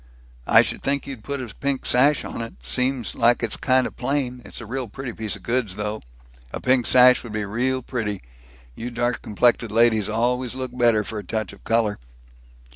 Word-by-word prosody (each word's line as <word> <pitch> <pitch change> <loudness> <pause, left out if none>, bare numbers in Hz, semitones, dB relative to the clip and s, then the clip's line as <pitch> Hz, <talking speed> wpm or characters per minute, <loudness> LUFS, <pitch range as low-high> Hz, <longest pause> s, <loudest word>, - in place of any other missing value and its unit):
"I - - +7
should - - -4
think 140 0 -1
you'd 130 -6 -8
put 140 -1 -4
a 115 -5 -9
pink 140 +2 -2
sash 140 +4 +4
on - - -5
it. 115 - -7
Seems 125 - 0
like 120 +1 +3
it's 115 - 0
kind 130 -1 +2
of - - -6
plain 125 -1 -2
it's - - -9
a 115 - -8
real 125 +2 -4
pretty 125 +3 -7
piece 110 -2 -2
of - - -12
goods, 115 -6 -1
though. 105 +1 -4 0.5
A - - -5
pink 130 -1 +2
sash 125 0 +6
would 115 -3 -9
be 105 -1 -2
real 125 +5 -1
pretty. 105 -6 -3 0.5
You 115 - -6
dark 120 0 -1
complected 115 +1 +1
ladies 110 -2 +3
always 125 +3 0
looks 130 -1 -5
better 120 -4 +3
for 110 0 -6
a - - -7
touch 110 +1 -4
of 100 - -17
color." 115 -2 +1
120 Hz, 200 wpm, -23 LUFS, 110-130 Hz, 0.5 s, I